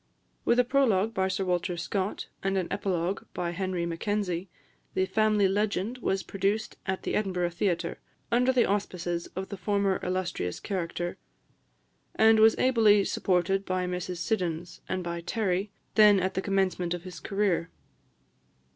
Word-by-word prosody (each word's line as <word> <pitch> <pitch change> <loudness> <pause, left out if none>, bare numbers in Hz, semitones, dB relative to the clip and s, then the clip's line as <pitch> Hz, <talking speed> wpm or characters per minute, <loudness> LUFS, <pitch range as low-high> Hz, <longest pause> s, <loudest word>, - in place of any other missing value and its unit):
With 235 - +3
a 250 - +6
prologue 230 -5 +2
by 190 -2 +1
Sir 190 0 -1
Walter 180 0 -1
Scott, 185 +3 -2
and 195 0 0
an 185 -2 0
epilogue 190 -1 -1
by 175 -1 -1
Henry 185 -1 -2
Mackenzie, 180 +1 -2 0.5
the 185 - +2
"Family 215 -1 +3
Legend" 205 +4 -1
was 195 -4 0
produced 200 +3 -1
at 190 0 -2
the - - -2
Edinburgh 180 -4 0
theatre, 170 -1 -1 0.3
under 250 +2 +4
the 250 -2 +3
auspices 175 -4 -2
of 190 +1 -4
the 200 - -5
former 200 0 +1
illustrious 180 - -2
character; 175 -2 -3 1.0
and 220 0 +6
was 220 0 +6
ably 220 -5 +5
supported 190 +1 +1
by 185 -1 -1
Mrs 180 0 -3
Siddons, 175 -2 -2
and 185 -1 -1
by 170 0 -4
Terry, 195 +1 -1 0.2
then 210 -2 +7
at 190 +1 -1
the 190 - -1
commencement 190 -3 0
of 175 - -8
his 180 -2 -8
career. 195 -5 0
190 Hz, 150 wpm, -28 LUFS, 180-205 Hz, 1.0 s, then